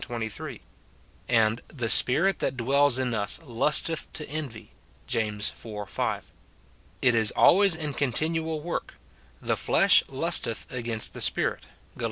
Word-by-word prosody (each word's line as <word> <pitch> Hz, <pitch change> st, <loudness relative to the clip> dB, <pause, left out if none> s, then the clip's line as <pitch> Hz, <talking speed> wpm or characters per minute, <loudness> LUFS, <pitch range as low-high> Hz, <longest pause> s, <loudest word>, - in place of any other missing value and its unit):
23; 115 Hz, -3 st, -6 dB, 0.7 s
and 115 Hz, -1 st, +2 dB
"the 120 Hz, -6 st, -5 dB
spirit 170 Hz, -, +3 dB
tliat 135 Hz, -1 st, -3 dB
dwells 135 Hz, +2 st, +2 dB
in 130 Hz, -2 st, -2 dB
us 105 Hz, -2 st, -1 dB
lusteth 150 Hz, +5 st, +2 dB
to 150 Hz, -, -6 dB
envy," 130 Hz, -8 st, -7 dB, 0.3 s
James 105 Hz, -2 st, -2 dB
iv. 105 Hz, -3 st, -7 dB
5. -, -, -4 dB, 0.7 s
It 125 Hz, -, +4 dB
is 110 Hz, -2 st, +2 dB
always 195 Hz, -2 st, +5 dB
in 150 Hz, -3 st, -4 dB
continual 155 Hz, +4 st, -2 dB
work; 170 Hz, +2 st, -5 dB, 0.2 s
" 65 Hz, -2 st, -30 dB
the -, -, +3 dB
flesh -, -, +4 dB
lusteth -, -, 0 dB
against 115 Hz, -3 st, 0 dB
the -, -, -5 dB
Spirit," -, -, +1 dB, 0.3 s
Gal. -, -, -18 dB
125 Hz, 140 wpm, -26 LUFS, 110-150 Hz, 0.7 s, always